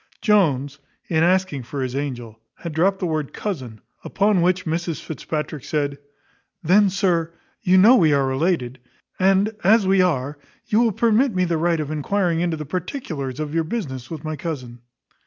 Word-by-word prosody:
Jones, 145 - +2 0.3
in 160 -2 +2
asking 185 -5 +1
for 130 +3 -5
his 130 0 -4
angel, 120 -6 -5 0.2
had 170 -2 -7
dropped 190 +5 +2
the 185 - -3
word 155 -4 -2
cousin, 130 - -5 0.2
upon 200 -2 +1
which 185 +1 +1
Mrs 165 0 -2
Fitzpatrick 150 -1 -5
said, 145 -2 -2 0.6
"Then, 195 +5 +4
sir, 180 -4 0 0.3
you 185 -2 +3
know 220 +7 +7
we 165 -10 +4
are 140 -1 +2
related: 130 -2 -1 0.4
and, 195 +3 +2
as 210 +3 +5
we 190 0 +4
are, 145 -5 -1 0.3
you 215 - +2
will 235 -1 +3
permit 230 +3 +2
me 185 0 +2
the 170 -2 -1
right 170 0 +1
of 150 -1 -3
enquiring 170 +3 0
into 170 -2 -1
the 150 - -6
particulars 160 - -5
of 150 -1 -4
your 165 0 +1
business 140 - -5
with 160 -3 -7
my 155 0 -3
cousin." 130 -7 -6
165 Hz, 175 wpm, -22 LUFS, 145-190 Hz, 0.6 s, know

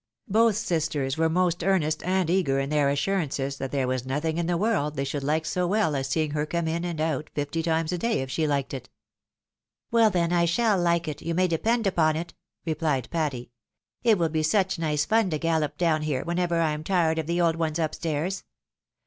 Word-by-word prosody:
Both 225 +1 +4
sisters 155 -9 -1
were 160 0 +2
most 175 0 +1
earnest 175 -5 +1
and 185 -1 0
eager 165 -6 +1
in 135 +1 -2
their 145 -2 +3
assurances 140 -3 -1
that 135 -1 -4
there 135 -3 0
was 130 -1 -1
nothing 150 +5 -2
in 170 - -1
the 175 -1 +1
world 180 -8 0
they 135 - -1
should 140 +1 -3
hke 155 +3 0
so 180 +2 0
well 195 -6 +1
as 135 -1 -1
seeing 155 +3 0
her 150 0 -1
come 170 0 -1
in 165 +2 -1
and 170 -3 -3
out 155 -2 -1
fifty 145 +3 -2
times 160 0 0
a 180 - -2
day, 230 - 0
if 130 - -7
she 160 - 0
hked 140 -2 -1
it. 130 -2 -7 0.5
" - - -62
Well, 230 -1 +5
then, 175 -3 0
I 170 -1 +3
shall 205 +3 +2
hke 170 -1 +1
it, 150 - -5
you 165 0 -2
may 185 +1 +3
depend 225 +7 0
upon 160 -5 +2
it," 170 +2 -5 0.3
replied 155 -6 -1
Patty. 140 -8 -2 0.3
" - - -66
It 225 -3 +4
will 165 -2 +1
be 155 0 0
such 190 +3 +1
nice 150 -2 0
fun 220 0 +2
to 155 - -1
gallop 155 -2 0
down 165 -3 +2
here, 150 -4 -1
whenever 175 0 0
I 160 -2 +2
am 150 0 -4
tired 165 -3 +1
of 155 - -3
the 170 +1 0
old 165 -2 +3
ones 160 -1 -1
up 160 -2 -1
stairs. 165 +4 -2
160 Hz, 225 wpm, -26 LUFS, 150-175 Hz, 0.5 s, Well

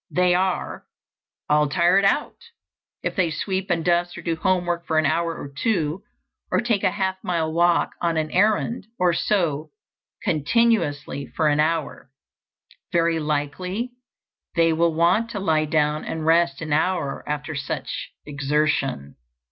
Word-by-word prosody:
They 180 0 +3
are 185 +1 -1 0.6
"all 150 0 +3
tired 180 +5 +3
out" 195 - +1 0.7
if - - -2
they 180 -3 +2
sweep 190 +5 -3
and 165 -2 0
dust 175 0 +1
or - - -8
do 165 -1 -1
housework 175 -1 0
for 160 - +1
an 155 - +3
hour 165 +3 0
or - - -6
two, 165 -1 0 0.5
or - - +3
take 230 -4 0
a 190 - +4
half 190 -1 -2
mile 165 -3 -1
walk 170 +1 +3
on 170 -2 0
an 155 -1 -1
errand, 210 +2 +1
or 180 -1 +3
sew 165 -6 0 0.5
continuously 155 - +1
for 155 -1 0
an 145 0 +1
hour. 155 -3 -1 0.8
Very 165 -1 +2
likely 160 - -2 0.6
they 165 -1 +4
will 165 0 +1
want 180 +8 +3
to 210 - -4
lie 160 -5 +1
down 150 0 +1
and 160 -1 -4
rest 165 -4 +3
an 155 -2 -2
hour 160 -2 0
after 150 +1 -3
such 140 -2 -4 0.2
exertion. 140 - -1
165 Hz, 150 wpm, -23 LUFS, 150-185 Hz, 0.8 s, a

